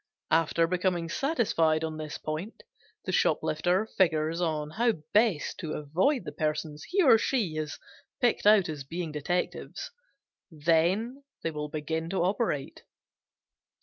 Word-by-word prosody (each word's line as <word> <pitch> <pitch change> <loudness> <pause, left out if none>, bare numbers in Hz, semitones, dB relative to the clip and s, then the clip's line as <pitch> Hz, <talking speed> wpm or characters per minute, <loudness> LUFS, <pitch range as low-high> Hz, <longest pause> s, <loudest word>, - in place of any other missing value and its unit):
After 165 +1 +3
becoming 175 -1 0
satisfied 170 - +1
on 160 -1 -3
this 155 -1 -5
point 155 +8 -5 0.4
the - - -2
shoplifter 180 +6 +1
figures 165 -4 +1
on 155 -3 -1
how 235 +5 +2 0.2
best 210 -7 +2
to 155 -2 -4
avoid 180 - +1
the - - -5
persons 150 -1 -3
he 385 +1 +2
or 240 -7 +7
she 220 - 0
have 155 -1 -3 0.5
picked 240 -4 +2
out 210 -3 +6
as 150 -4 -5
being 165 +3 -5
detectives, 175 - -3 0.6
then 175 - +1 0.2
will 150 -2 -3
begin 160 +2 -3
to 190 -1 0
operate. 185 - -1
165 Hz, 130 wpm, -28 LUFS, 155-205 Hz, 0.6 s, or